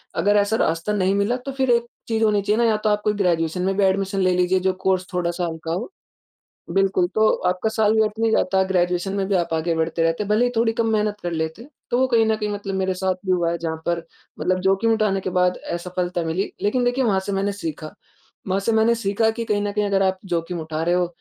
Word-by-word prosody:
अगर 205 +1 +2
ऐसा 205 +2 +2
रास्ता 165 +6 0
नहीं 195 -1 +1
मिला 205 +5 +1
तो 275 - -3
फ़िर 265 -1 -1
एक 235 0 +3 0.2
चीज़ 225 -1 0
होनी 210 -2 +3
चाहिए 210 +2 +1
ना - - +4
या 215 - +2
तो 215 - +4
आप 210 0 +1
कोई 210 - +2
ग्रेजुएशन 165 0 0
में 195 - 0
भी 205 - +3
एडमिशन 195 +1 +1
ले 185 -1 +3
लीजिए 180 +1 +2
जो 185 0 +1
कोर्स 185 -1 +1
थोड़ा-सा 175 0 -1
हल्का 160 0 -4
हो। 215 - -4 0.8
बिल्कुल, 195 -2 +2
तो 215 +3 +2 0.2
आपका 185 +4 0
साल 220 -1 +2
व्यर्थ 215 -1 +2
नहीं 225 - +2
जाता 190 -2 +2
है 190 - +3
ग्रेजुएशन 180 +1 0
में 195 -1 0
भी 200 - +1
आप 170 -2 -1
आगे 165 +1 0
बढ़ते 160 +1 0
रहते 165 +4 +1
हैं 200 - -8
भले 215 +3 +3
ही 245 - +1
थोड़ी 225 0 +2
कम 230 -1 0
मेहनत 210 -1 0
कर 175 - -3
लेते। 160 +8 -4 0.2
तो 240 - +2
वो 260 - +3
कहीं 230 -3 +3
न 220 - +2
कहीं 210 -1 -3
मतलब 200 -1 -4
मेरे 190 -1 0
साथ 185 0 0
भी 185 - +2
हुआ 175 -2 +1
है 170 - -2
जहाँ 160 -1 -3
पर 170 -1 -1 0.4
मतलब 185 0 +1
जोख़िम 195 +4 +2
उठाने 210 -3 +1
के 185 - -4
बाद 180 0 +2 0.2
असफ़लता 175 0 -3
मिली 165 +4 -2
लेक़िन 245 +5 +1
देखिए 245 +2 +1
वहाँ 195 -4 +2
से 200 - -2
मैंने 195 +1 0
सीखा। 160 -5 -6 0.5
वहाँ 190 +1 +1
से 215 - 0
मैंने 225 +1 +3
सीखा 220 0 +1
कि 230 - -2
कहीं 210 -2 0
न 205 - -1
कहीं 210 0 0
अगर 195 -1 +2
आप 190 0 0
जोख़िम 170 -1 -2
उठा 155 0 -3
रहे 175 +1 +2
हो 180 -1 +1
195 Hz, 255 wpm, -22 LUFS, 175-210 Hz, 0.8 s, ना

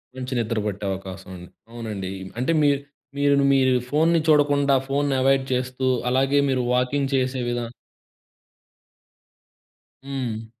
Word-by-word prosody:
మంచి 130 0 -5
నిద్ర 115 -1 -1
పట్టే 105 -1 -4
అవకాశముంది. 95 -2 -8 0.2
అవునండి. 105 -5 -5 0.3
అంటే, 130 +6 +1
మీర్ 140 -1 +3 0.4
మీరు 145 0 +3
ను - - +3
మీరు 130 -1 +3 0.2
ఫోన్‌ని 165 +4 +3
చూడకుండా 145 -2 +4
ఫోన్‌ని 140 0 0
ఎవాయిడ్ 135 0 +3
చేస్తూ, 130 +1 -2 0.2
అలాగే 135 +2 +2
మీరు 130 -1 +1
వాకింగ్ 135 +2 0
చేసే 130 0 0
విధా 120 0 -2 2.4
హ్మ్. 125 -5 -4
130 Hz, 120 wpm, -23 LUFS, 115-140 Hz, 2.4 s, చూడకుండా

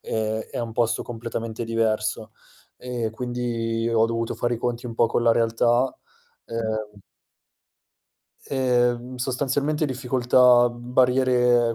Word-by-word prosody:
ehm, 110 0 -2
è - - -5
un 115 -1 -4
posto 120 0 0
completamente 115 -1 -5
diverso, 110 -1 -1 0.4
e 120 -3 -4
quindi 115 -1 -2
ho 115 -1 +4
dovuto 115 0 -2
fare 120 0 -1
i - - -6
conti 120 +1 -3
un 115 - -6
po' 115 0 +3
con 120 - 0
la 115 - +4
realtà, 120 +2 +2 0.5
ehm 110 -2 -4 1.5
Ehm, 125 -1 0
sostanzialmente 140 +4 -1
difficoltà, 125 -2 +4
barriere 125 -1 +2
120 Hz, 120 wpm, -24 LUFS, 115-125 Hz, 1.5 s, ho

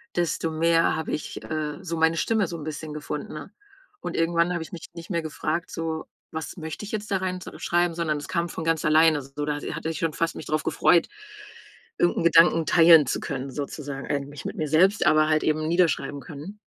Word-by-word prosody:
desto 170 -1 0
mehr 165 +1 +3
habe 160 - -4
ich, 150 - -5
äh, 155 -2 -3
so 170 -2 -3
meine 160 +1 +3
Stimme 220 +1 +1
so 170 - -5
'n 155 - -8
bisschen 155 0 -5
gefunden, 150 0 -5
ne, 150 +4 -8 0.5
und - - -4
irgendwann 170 +1 +2
habe 170 - -2
ich 160 - -13
mich 170 - -8
nicht 170 +1 -10
mehr 170 -3 0
gefragt: 160 +2 -3
„So, 160 -1 -3 0.3
was 160 +3 -6
möchte 160 +2 -6
ich 205 - -8
jetzt 215 -1 -4
da 195 - +3
rein 185 -1 -3
so - - -9
schreiben?“, 175 -1 +1
sondern 160 -3 -1
es 145 - -7
kam 170 0 -1
von 160 - -5
ganz 165 -1 +1
alleine, 155 0 +5
so. 135 +2 -5
Da, 145 0 -2
äh, - - -5
hatte 160 - -4
ich 160 -1 -4
schon 165 - 0
fast 165 +1 -1
mich - - -8
drauf 155 0 0
gefreut, 170 - +3 0.9
irgend 175 - +2
'n - - 0
Gedanken 165 -1 +6
teilen 165 -2 +7
zu - - -1
können, 135 +1 -4
sozusagen 140 -1 -5
eigentlich 140 -1 -4
mit - - -5
mir 155 - -1
selbst, 185 +7 +4
aber 155 -1 +4
halt 155 0 +2
eben 155 0 +1
niederschreiben 165 -5 +1
können. 155 +10 -9
160 Hz, 225 wpm, -25 LUFS, 150-170 Hz, 0.9 s, teilen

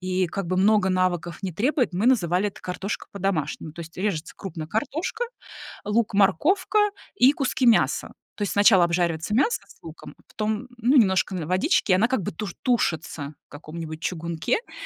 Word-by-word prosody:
и 185 0 0
как 195 +2 -4
бы 185 - -1
много 205 +1 +4
навыков 180 -2 0
не 185 - -3
требует, 245 - +1
мы 195 +6 0
называли 195 -5 +3
это - - -13
картошка 190 +3 -4
по-домашнему. 170 -6 -2
То 170 - -10
есть 165 0 -10
режется 180 -5 -2
крупно 165 -5 -6
картошка, 315 - -2 0.6
лук, 210 +1 0
морковка 295 - +3 0.4
и 265 -6 +6
куски 265 -3 0
мяса. 230 - +3 0.2
То 210 - -5
есть 200 - -1
сначала 200 -3 +6
обжаривается 170 +2 0
мясо 285 - +2
с - - -19
луком, - - -11
потом, 215 +3 -3
ну, 245 +5 +2
немножко 190 -4 +3
водички, 185 - +1
она 200 +5 +4
как 260 -5 0
бы - - -3
туш 190 +2 -6
тушится 160 - -1
в - - -88
каком-нибудь 155 +1 -8
чугунке. 170 - -1
То - - -23
190 Hz, 170 wpm, -24 LUFS, 170-220 Hz, 0.6 s, и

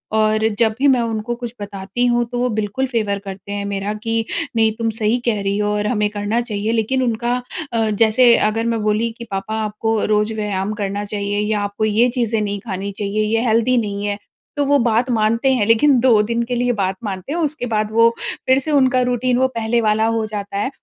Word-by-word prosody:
और 215 0 +2
जब 220 -2 +3
भी 285 - +4
मैं 260 -3 +4
उनको 230 +1 -2
कुछ 240 -1 -7
बताती 200 +4 -3
हूँ 240 0 +2
तो 245 - -2
वो 250 0 +1
बिल्कुल 215 +5 -1
फेवर 215 -5 -1
करते 195 0 -9
हैं 205 0 -3
मेरा 200 +1 -3
कि, 225 +1 -2 0.3
"नहीं 220 -1 +3
तुम 225 0 -2
सही 220 +2 +1
कह 215 -4 +1
रही 200 0 -1
हो 210 0 0
और 210 0 -1
हमें 210 -3 +1
करना 205 +2 -1
चाहिए।" 215 -2 -2
लेकिन 235 +3 0
उनका 240 0 0 0.4
अ, 225 -1 +1
जैसे 225 +3 +5
अगर 225 +1 -2
मैं 225 - -2
बोली 215 +2 +1
कि, 235 - -8
"पापा 195 +3 -3
आपको 215 +1 -1
रोज़ 210 +1 +1
व्यायाम 210 -1 -2
करना 200 +1 -2
चाहिए 205 0 -2
या 210 0 0
आपको 205 +2 -2
ये 220 +3 +3
चीज़ें 230 -2 +1
नहीं 205 -1 -2
खानी 200 -1 -4
चाहिए, 205 +1 -2
ये 225 +2 +1
हेल्दी 230 +3 +3
नहीं 205 -3 -2
हैं।" 205 0 -2 0.4
तो 290 - +2
वो 285 +1 +4
बात 235 +1 +1
मानते 230 +4 +2
हैं, 235 -5 +1
लेकिन 250 +3 +4
2 230 -4 +5
दिन 235 +2 -1
के 245 - 0
लिए 245 +1 +1
बात 195 -3 -1
मानते 195 +4 -5
हैं 340 - -1
उसके 310 -5 -2
बाद 215 -1 0
वो 230 +1 +5 0.4
फिर 260 +1 +5
से 305 +3 -3
उनका 260 -3 +3
रूटीन 245 0 +1
वो 260 - +3
पहले 230 +1 +1
वाला 215 0 +2
हो 225 -1 0
जाता 205 -2 -5
है। 205 - 0
220 Hz, 220 wpm, -19 LUFS, 205-240 Hz, 0.4 s, जैसे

